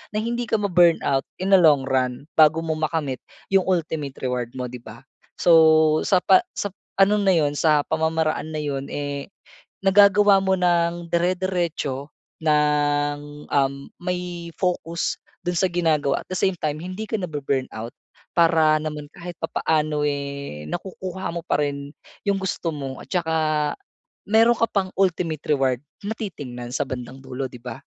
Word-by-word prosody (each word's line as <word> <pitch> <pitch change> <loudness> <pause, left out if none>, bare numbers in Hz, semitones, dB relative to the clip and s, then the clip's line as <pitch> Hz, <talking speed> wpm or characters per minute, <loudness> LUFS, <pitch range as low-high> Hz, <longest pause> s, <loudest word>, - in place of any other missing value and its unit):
na 215 - 0
hindi 240 +1 -2
ka - - +2
ma-burnout 175 -8 +3 0.2
in 195 - 0
a 190 - +8
long 150 -5 +5
run, 130 -1 -1 0.2
bago 155 +1 +6
mo 165 - -2
makamit 155 -4 -1 0.3
'yong 195 -1 +3
ultimate 160 -6 -1
reward 125 -2 -1
mo 125 -1 -3
'di 125 - -7
ba? 120 - -12 0.3
So, 160 -2 +5
sapa 195 - +5 0.2
sap 205 - -3 0.3
ano 200 +2 +4
na 195 -2 +3
'yon, 150 -3 +2
sa 150 -2 +4
pamamaraan 160 0 0
na - - -1
'yon, 140 -1 -3
eh, 145 -1 -4 0.5
nagagawa 200 0 +5
mo 190 -1 +1
nang 170 -1 +1
dire-diretso, 170 -5 -1 0.3
nang, 145 -1 +1
uhm, 140 0 0 0.2
may 180 -2 -4
focus 175 -2 -1 0.3
dun 175 - 0
sa 185 +1 +1
ginagawa 155 -5 +1
at - - -47
the - - -2
same 190 -1 +2
time 150 0 -2
hindi 185 +4 -5
ka 220 - -2
na-bu-burnout. 140 - -3 0.4
Para 160 -2 +4
naman 150 -1 -5
kahit 175 -1 -8
papaano 155 -2 0
eh, 140 - -4
nakukuha 185 - -5
mo 170 - -3
pa 155 - 0
rin 140 0 -4 0.4
'yong 200 -1 +2
gusto 180 -3 -2
mo 135 -2 -6
at - - -14
saka 165 -3 0 0.9
meron 225 +3 +4
ka 230 - +3
pang 190 -2 0
ultimate 165 -5 0
reward 135 -4 +2 0.2
na 205 +2 -3
titingnan 125 - -6
sa 145 - 0
bandang 130 +1 -6
dulo 135 0 -4
'di 125 -1 -11
ba? 125 - -7
160 Hz, 155 wpm, -23 LUFS, 145-180 Hz, 0.9 s, a